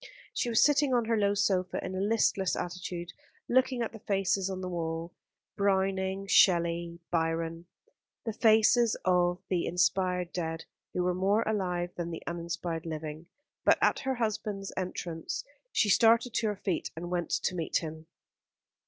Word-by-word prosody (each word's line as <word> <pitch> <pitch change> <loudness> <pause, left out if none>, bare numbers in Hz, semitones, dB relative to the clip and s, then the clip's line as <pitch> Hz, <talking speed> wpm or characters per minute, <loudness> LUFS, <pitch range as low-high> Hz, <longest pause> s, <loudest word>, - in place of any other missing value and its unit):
She 240 - -1
was 230 0 +4
sitting 285 -2 +3
on 240 -2 +2
her 230 0 +1
low 205 -1 +2
sofa 185 -2 +1
in 185 - -4
a 185 - -3
listless 200 -3 +2
attitude, 180 -1 -5 0.3
looking 255 -1 +2
at 225 - -3
the 225 - -10
faces 195 -1 0
on 185 -1 -4
the 185 - -4
wall 165 -1 -3 0.4
Browning, 195 -1 0
Shelley, 170 -3 +3
Byron 165 0 -1 0.6
the 225 - -2
faces 225 +1 +4
of 180 0 +2
the 180 -3 0
inspired 180 0 +1
dead 165 -2 -3 0.3
who 180 - +1
were 180 0 +1
more 195 +5 +2
alive 180 -4 -1
than 170 -1 -4
the 165 - -6
uninspired 170 -1 -4
living; 155 0 -6 0.4
but - - +5
at - - +3
her 265 -1 -1
husband's 210 -4 -3
entrance 175 -3 -4 0.3
she 220 - +2
started 230 +4 +4
to 230 - +1
her 210 - -1
feet 190 -3 -2
and 175 +2 -6
went 175 -2 -1
to - - 0
meet 170 -3 0
him. 160 -1 -6
185 Hz, 160 wpm, -30 LUFS, 170-210 Hz, 0.6 s, but